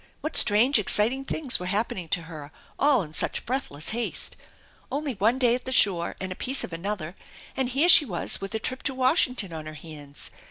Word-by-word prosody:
What 310 - -5
strange 230 +6 +5
exciting 230 +6 +1
things 275 -2 0
were 180 - -6
happening 195 -4 -2
to 170 - -1
her 155 -3 -10 0.3
all 275 -7 +3
in 155 -2 -11
such - - -2
breathless 225 - -3
haste! 235 +1 -2 0.6
Only 285 0 -3
one 225 +4 +1
day 245 -3 +3
at 250 - -4
the 260 - -5
shore 185 -9 +2
and 190 -1 -5
a - - -5
piece 265 +6 0
of 180 - -7
another, 175 -1 -5 0.4
and 260 -2 -1
here 275 +7 +2
she 330 -4 +8
was 185 -5 -2
with 195 +3 -6
a - - -1
trip 255 +3 -1
to 265 - -7
Washington 255 - +1
on 155 -1 -7
her 155 - -8
hands 150 -2 -9
215 Hz, 205 wpm, -25 LUFS, 170-260 Hz, 0.6 s, she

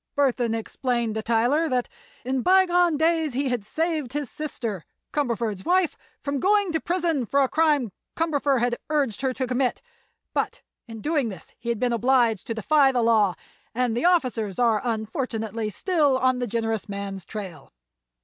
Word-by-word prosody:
Burthon 250 -5 +1
explained 235 0 -2
to 220 - -2
Tyler 240 +9 +2
that 250 -2 0 0.4
in 260 0 0
bygone 355 -1 +4
days 320 -2 +1
he 270 +2 0
had 245 -4 -1
saved 310 +2 -2
his 290 -4 -3
sister, 230 - -4 0.3
Cumberford's 230 -8 -1
wife, 360 -2 +2 0.3
from 280 -1 -1
going 405 +2 +3
to 320 - 0
prison 340 -6 0
for 275 +5 +2
a - - +2
crime 295 -7 +2 0.3
Cumberford 290 -5 +1
had 240 0 +1
urged 280 -8 0
her 265 -1 +1
to 260 +1 -2
commit, 250 0 0 0.5
but - - -2 0.2
in 225 -2 -8
doing 295 -4 0
this 190 - -10
he 235 +1 -5
had 235 -3 -1
been 245 -1 +1
obliged 235 -3 +2
to 230 - -2
defy 275 +4 +4
the 245 -2 +1
law, 215 -5 +3 0.4
and 245 -2 +1
the 245 - 0
officers 250 - +1
are 230 -4 +3
unfortunately 225 -1 -2
still 295 - +1
on 255 -1 +2
the 245 - -1
generous 225 -1 -2
man's 200 -1 -5
trail. 185 -9 -8
250 Hz, 170 wpm, -25 LUFS, 225-295 Hz, 0.5 s, bygone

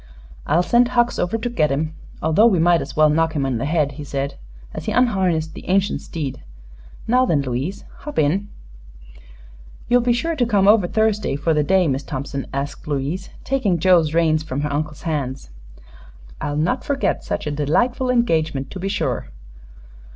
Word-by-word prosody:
"I'll 165 +4 +3
send 240 +5 +4
Hucks 240 -1 +1
over 180 +6 0
to 225 +2 -3
get 155 - +1
him, 155 +3 -1 0.3
although 160 +9 +5
we 200 -6 +3
might 170 0 +4
as - - -7
well 155 0 +5
knock 160 +1 +1
him 140 -2 0
in 130 -4 -1
the 135 - -2
head," 150 -3 +1
he 145 +2 -8
said 140 0 -3 0.4
as - - -6
he - - -1
unharnessed 185 -10 +1
the - - -10
ancient 195 +1 +1
steed. 145 -6 -5 0.6
"Now 250 +3 +3
then, 145 -8 +2
Louise, 135 +9 -4
hop 295 - -8
in." 180 +7 +1 1.4
"You'll 245 0 +5
be 240 0 +1
sure 330 +8 0
to 260 - +1
come 200 -4 +3
over 205 -3 +5
Thursday, 215 -5 0
for 155 +3 0
the 150 -1 +2
day, 185 +2 +3
Miss 135 -1 0
Thompson?" 140 0 -5
asked 140 +2 -5
Louise, 150 +6 -3
taking 245 -10 +1
Joe's 170 -2 +4
reins 160 -1 +2
from 145 -3 -4
her 145 -1 -2
uncle's 150 0 -3
hands. 135 - -3 0.9
"I'll 145 0 -2
not 180 - 0
forget 280 -1 -1
such - - -3
a 150 - -2
delightful 210 - 0
engagement, 160 - 0
be 195 - -2
sure." 210 +1 -2
165 Hz, 180 wpm, -21 LUFS, 145-210 Hz, 1.4 s, although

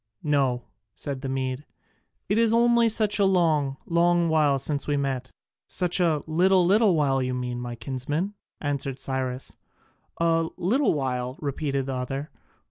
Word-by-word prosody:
"No," 135 -5 +1 0.3
said 140 -2 -5
the 135 - -4
Mede, 130 +1 -2 0.6
"it 205 +3 +2
is 230 -1 +4
only 235 0 +4
such 215 -1 +1
a - - +4
long, 155 -7 +2
long 170 0 +2
while 150 -3 +3
since 140 +2 -3
we 145 -1 +1
met." 135 -2 -2 0.4
"Such 180 0 +1
a 160 -5 +2
little, 180 +3 +3
little 200 0 +4
while 135 -3 +2
you 125 0 -1
mean, 125 -1 -3
my 120 -1 -5
kinsman," 145 - -3 0.3
answered 140 -2 -3
Cyrus. 130 -1 -4 0.6
"A 165 -1 +1
little 245 - +2
while!" 125 -2 -2
repeated 140 -2 -2
the 135 - -3
other. 135 +3 -4
145 Hz, 150 wpm, -25 LUFS, 130-175 Hz, 0.6 s, is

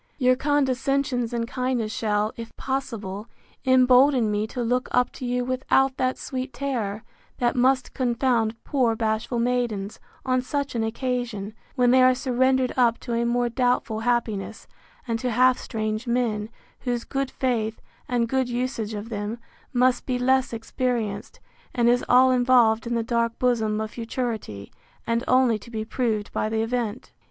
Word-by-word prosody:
Your 255 -2 +4
condescensions 270 -2 0
and 235 -1 -2
kindness 250 -3 -1
shall, 210 -1 0
if 230 -1 -9
possible, 225 -6 -4 0.4
embolden 255 -2 +5
me 210 +1 0
to 245 +2 -4
look 250 +2 0
up 250 0 +2
to 255 - -6
you 245 0 0
without 260 +1 +1
that 255 0 0
sweet 260 0 -5
terror, 225 -7 -3 0.3
that 240 -1 +1
must 255 +1 +2
confound 240 -3 +1
poor 245 -5 +1
bashful 220 +2 -1
maidens, 235 -4 -1 0.3
on 255 -1 +2
such 280 +1 -3
an 230 -2 -1
occasion, 230 -3 -3 0.2
when 250 -2 +4
they 260 0 +6
are 255 0 +6
surrendered 260 0 +1
up 235 -2 +3
to 240 - -4
a 235 0 +1
more 240 0 +1
doubtful 245 -2 0
happiness, 225 -3 -1 0.4
and 230 -1 -1
to 255 - -1
half 255 +2 +4
strange 215 0 -3
men, 230 -3 0 0.3
whose 245 -2 -2
good 275 -1 -2
faith, 225 -5 -1 0.3
and 240 -2 +1
good 260 0 0
usage 240 -3 -2
of 210 +2 -6
them, 210 +1 -4 0.3
must 250 0 +2
be 255 -2 0
less 260 +1 +2
experienced, 225 -2 -3 0.4
and 240 -2 +3
is 245 +1 +3
all 255 +1 +6
involved 245 -3 +4
in 235 - -1
the 230 - 0
dark 230 0 0
bosom 220 -4 +1
of 220 0 -3
futurity, 225 - -4 0.3
and 230 +1 0
only 255 -4 +3
to 235 - -13
be 220 -2 -4
proved 220 -3 -2
by 215 - -1
the 220 0 0
event. 235 -1 -3
245 Hz, 160 wpm, -24 LUFS, 225-255 Hz, 0.4 s, they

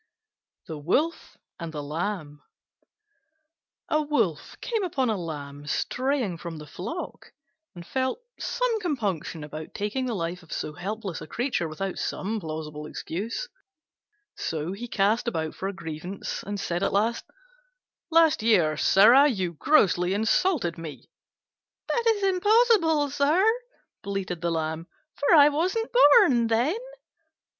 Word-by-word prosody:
THE 160 -2 -6
WOLF 290 - -1 0.2
AND 170 -2 -5
THE 150 -2 -5
LAMB 155 -1 -4 1.5
A 310 - +2
Wolf 290 - -1
came 450 -4 -2
upon 270 -9 0
a - - 0
Lamb 145 -5 -7
straying 250 - -1
from 170 -2 -6
the 150 - -9
flock, 190 - -7 0.4
and 170 -1 -9
felt 260 - -1 0.2
some - - 0
compunction 205 - -2
about 155 +1 -8
taking 230 +6 -2
the 235 - -2
life 175 0 -3
of 165 - -18
so 150 - -3
helpless 195 +1 -5
a 155 - -8
creature 240 - -1
without 180 +5 -4
some 215 +3 -2
plausible 155 -3 -6
excuse; 220 - -4 0.9
so 160 +1 -3
he 220 +5 -6
cast 215 +2 +1
about 160 -8 -2
for 190 - -4
a - - -2
grievance 170 +2 -6
and 205 0 -5
said 175 -1 -2
at - - +1
last, 220 +4 +1 0.9
"Last 325 -5 +4
year, 180 -9 +3
sirrah, 235 - +6
you 185 -8 -2
grossly 185 - +3
insulted 220 - +1
me." 160 -3 -9 0.8
"That 475 - +1
is 430 -3 +2
impossible, 385 - +3
sir," 295 +7 +3 0.6
bleated 195 -4 -4
the 170 - 0
Lamb, 160 0 -2 0.3
"for 285 +4 +3
I 295 -1 +8
wasn't 370 +11 -1
born 285 - +6
then." 245 - +1
200 Hz, 135 wpm, -26 LUFS, -, 1.5 s, I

